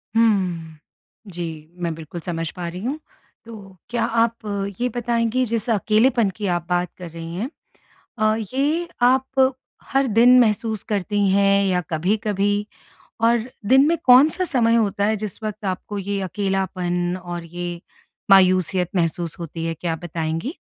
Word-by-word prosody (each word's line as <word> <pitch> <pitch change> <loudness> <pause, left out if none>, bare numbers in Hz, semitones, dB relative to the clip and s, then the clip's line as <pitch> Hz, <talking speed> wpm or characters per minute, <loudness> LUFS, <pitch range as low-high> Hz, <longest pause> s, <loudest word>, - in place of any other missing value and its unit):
हुँ। 180 -8 +1 0.5
जी, 165 -2 -7
मैं 170 -2 -1
बिल्कुल 165 +1 -8
समझ 165 -2 -3
पा 175 -2 -5
रही 180 +2 -6
हूँ। 285 +4 -2 0.5
तो 200 -5 -12
क्या 235 -1 -1 0.2
आप 230 0 -1 0.4
ये 250 +1 0
बताएँगी, 235 +1 0
जिस 230 0 -2
अकेलेपन 220 +1 +3
की 205 -2 -3
आप 170 - -8
बात 180 0 0
कर 180 -2 -8
रही 165 +1 -8
हैं 225 +8 -3 0.7
अ, 215 0 +3 0.2
ये 310 +6 0
आप 265 +1 +3 0.4
हर 275 0 +2
दिन 245 +2 +6
महसूस 220 -2 +1
करती 205 0 -1
हैं 200 0 +3
या 180 -1 +1
कभी-कभी 205 +4 0 0.6
और 235 +1 +2 0.2
दिन 265 +2 +6
में 335 +1 +2
कौन-सा 280 +8 +6
समय 235 -6 +3
होता 200 -3 +1
है, 215 +1 +2
जिस 215 +1 -6
वक़्त 215 0 -5
आपको 190 +2 -4
ये 200 +1 -2
अकेलापन 185 -2 -1
और 175 -1 -5
ये 175 0 -6 0.5
मायूसियत 185 -2 +4
महसूस 170 0 -1
होती 165 0 -5
है? 165 - -1
क्या 165 +1 -3
आप 160 - -6
बताएँगी? 165 - -3
200 Hz, 150 wpm, -22 LUFS, 175-230 Hz, 0.7 s, दिन